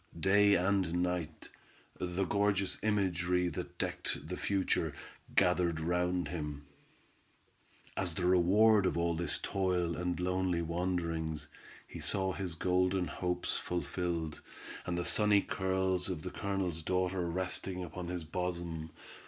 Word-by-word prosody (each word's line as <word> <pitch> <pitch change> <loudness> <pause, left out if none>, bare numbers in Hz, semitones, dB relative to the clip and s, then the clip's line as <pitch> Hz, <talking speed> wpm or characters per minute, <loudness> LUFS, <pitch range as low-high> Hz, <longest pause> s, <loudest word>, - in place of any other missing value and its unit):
Day 100 +3 +5
and 90 -2 +2
night, 85 -3 -3 0.5
the 90 +2 -1
gorgeous 100 0 +1
imagery 90 -4 +1
that - - -6
decked - - -3
the - - -2
future, 100 -2 0 0.4
gathered 90 -2 +3
round 90 +2 0
him. 75 -4 -5 1.3
As 90 -4 -1
the 90 - -1
reward 95 +3 +5
of - - -1
all 85 0 +1
this 85 +1 0
toil 90 -3 0
and 90 0 -2
lonely 90 -1 0
wanderings, 85 -2 -2 0.4
he - - -8
saw 95 -1 0
his 90 -4 -4
golden 90 +2 +2
hopes 90 0 -2
fulfilled, 85 -2 -2 0.5
and 85 -1 -1
the 85 - -1
sunny 105 -2 +5
curls 95 -1 0
of 85 -4 -4
the 90 - -4
Colonel's 95 -4 -2
daughter 90 +1 0
resting 90 +1 -2
upon 90 +1 -6
his 90 -1 -3
bosom. 85 -1 -3
90 Hz, 130 wpm, -33 LUFS, 85-95 Hz, 1.3 s, Day